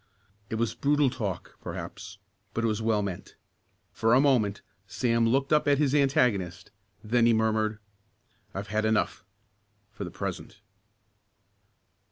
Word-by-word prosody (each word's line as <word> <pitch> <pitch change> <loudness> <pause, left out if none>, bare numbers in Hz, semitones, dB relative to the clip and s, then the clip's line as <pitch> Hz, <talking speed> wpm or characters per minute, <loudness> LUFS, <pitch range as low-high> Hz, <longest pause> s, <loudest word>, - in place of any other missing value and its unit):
It - - -2
was 115 -1 0
brutal 145 -2 +2
talk, 100 -8 -5
perhaps, - - -7 0.4
but 115 - 0
it - - +3
was 110 0 -1
well 110 -2 +1
meant. 95 -3 -6 0.6
For 115 +1 +2
a - - +6
moment 120 -8 +2 0.2
Sam 115 +2 +1
looked 135 +4 +1
up 150 0 +3
at 140 -1 +4
his 145 -2 +2
antagonist. 125 - +1 0.3
Then 115 +2 +3
he 115 - +5
murmured: 110 -1 +1 0.7
"I've 100 +1 -6
had 110 +1 0
enough 110 0 0 0.7
for 105 -1 -7
the 90 - -5
present." - - -6
115 Hz, 140 wpm, -28 LUFS, 105-130 Hz, 0.7 s, a